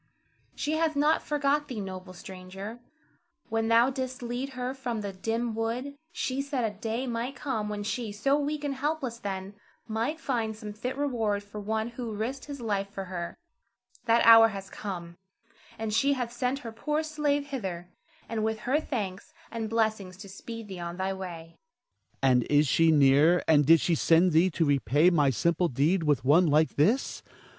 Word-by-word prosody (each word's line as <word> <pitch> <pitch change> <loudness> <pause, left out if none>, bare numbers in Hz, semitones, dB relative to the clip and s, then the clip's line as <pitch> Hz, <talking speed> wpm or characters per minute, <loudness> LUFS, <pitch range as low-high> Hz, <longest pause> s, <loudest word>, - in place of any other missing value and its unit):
She 295 - -2
hath 320 -1 +1
not 295 +2 +3
forgot 295 0 0
thee, 245 -4 -5
noble 185 -1 -7
stranger. 190 +5 -9 0.7
When 225 0 0
thou 230 +3 +5
didst 260 -1 -4
lead 245 +3 -4
her 250 +1 -3
from 245 -4 -4
the 200 -1 -5
dim 225 +4 -2
wood, 235 +5 -3 0.2
she 275 -6 -2
said 275 -3 -2
a 215 -2 -2
day 225 +5 -3
might 240 +2 -3
come 225 -7 -3
when 205 -1 -4
she, 225 +1 -3
so 235 +7 +1
weak 295 0 -2
and 285 -1 -1
helpless 270 -4 -2
then, 195 -1 -5 0.3
might 230 +8 -2
find 230 -7 -2
some 210 -1 -8
fit 250 +5 -4
reward 225 -8 0
for 205 +1 -9
one 220 +2 -1
who 235 -2 -6
risked 245 +6 -4
his 285 -2 -7
life 200 -4 -2
for 200 -1 -6
her. 175 -2 -5 0.7
That 230 0 +4
hour 225 0 +9
hath 195 -2 -7
come, 175 -4 -6 0.6
and 220 -1 -3
she 275 +6 +3
hath 245 -3 -3
sent 250 +2 -1
her 230 - -4
poor 300 +7 -1
slave 295 -2 -1
hither, 190 -10 -4 0.4
and 225 -1 -2
with 220 0 -1
her 270 +7 +1
thanks 200 -11 -5 0.2
and 225 -2 -3
blessing 220 -4 0
to 200 +2 -11
speed 225 +3 -8
thee 190 -3 -7
on 170 0 -5
thy 190 +1 -1
way. 180 -3 -6
Ernest. 320 - -28
And 125 -2 +4
is 145 0 +4
she 165 +4 +4
near, 150 +4 +5
and 150 -3 +5
did 165 0 +7
she 175 - +1
send 165 +3 +4
thee 165 +4 +4
to 165 -1 0
repay 145 - +3
my 150 -5 +3
simple 170 +7 +1
deed 155 +7 +1
with 145 -6 +1
one 165 +6 +5
like 155 +1 +3
this? 215 - +1
220 Hz, 185 wpm, -28 LUFS, 185-255 Hz, 0.7 s, hour